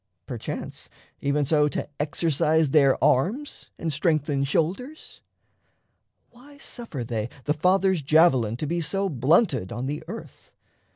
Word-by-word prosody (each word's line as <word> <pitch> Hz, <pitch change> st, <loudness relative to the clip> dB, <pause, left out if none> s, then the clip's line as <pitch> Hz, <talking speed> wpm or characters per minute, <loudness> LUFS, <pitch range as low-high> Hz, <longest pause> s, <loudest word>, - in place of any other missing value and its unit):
perchance, -, -, -6 dB, 0.3 s
even 140 Hz, +1 st, 0 dB
so 150 Hz, +1 st, +3 dB
To 145 Hz, -, -3 dB
exercise 155 Hz, 0 st, +1 dB
their 140 Hz, -3 st, +5 dB
arms 220 Hz, -, 0 dB
and 160 Hz, -2 st, -3 dB
strengthen 145 Hz, -3 st, +1 dB
shoulders? 190 Hz, -, -3 dB, 1.1 s
Why 275 Hz, +4 st, -17 dB
suffer 235 Hz, -, -7 dB
they 115 Hz, -1 st, -3 dB
the 150 Hz, -, +1 dB
Father's 185 Hz, +2 st, +2 dB
javelin 135 Hz, -7 st, +3 dB
To 155 Hz, -, -3 dB
be 170 Hz, +3 st, -1 dB
so 195 Hz, +5 st, -1 dB
blunted 135 Hz, -, +2 dB
on 120 Hz, +2 st, -4 dB
the 145 Hz, +3 st, -4 dB
earth? 225 Hz, +6 st, -10 dB
155 Hz, 125 wpm, -25 LUFS, 140-185 Hz, 1.1 s, their